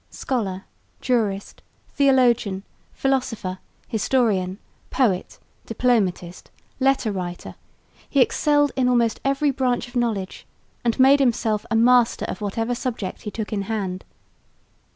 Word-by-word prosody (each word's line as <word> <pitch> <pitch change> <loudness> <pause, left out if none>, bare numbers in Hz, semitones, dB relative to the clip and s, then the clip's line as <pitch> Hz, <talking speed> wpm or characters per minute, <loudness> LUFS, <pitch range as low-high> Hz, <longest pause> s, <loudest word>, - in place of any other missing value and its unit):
Scholar, 200 -7 -3 0.3
jurist, 215 -6 -1 0.3
theologian, 245 -8 +2 0.3
philosopher, 230 -9 -2 0.3
historian, 215 -5 0 0.3
poet, 200 -9 0 0.3
diplomatist, 205 -7 0 0.3
letter 265 -4 +2
writer, 180 -2 -5 0.6
he 280 - +1
excelled 290 +3 +3
in 260 -1 +2
almost 235 -3 +2
every 275 +1 +1
branch 255 -2 -1
of 245 - -16
knowledge 220 -6 -2 0.4
and 235 +1 0
made 270 +2 +6
himself 225 -5 +1
a 230 - 0
master 240 +1 +4
of - - -6
whatever 225 +4 -2
subject 235 -6 -4
he 210 - -5
took 215 0 -5
in 200 - -1
hand. 190 -4 -3
230 Hz, 115 wpm, -23 LUFS, 200-255 Hz, 0.6 s, made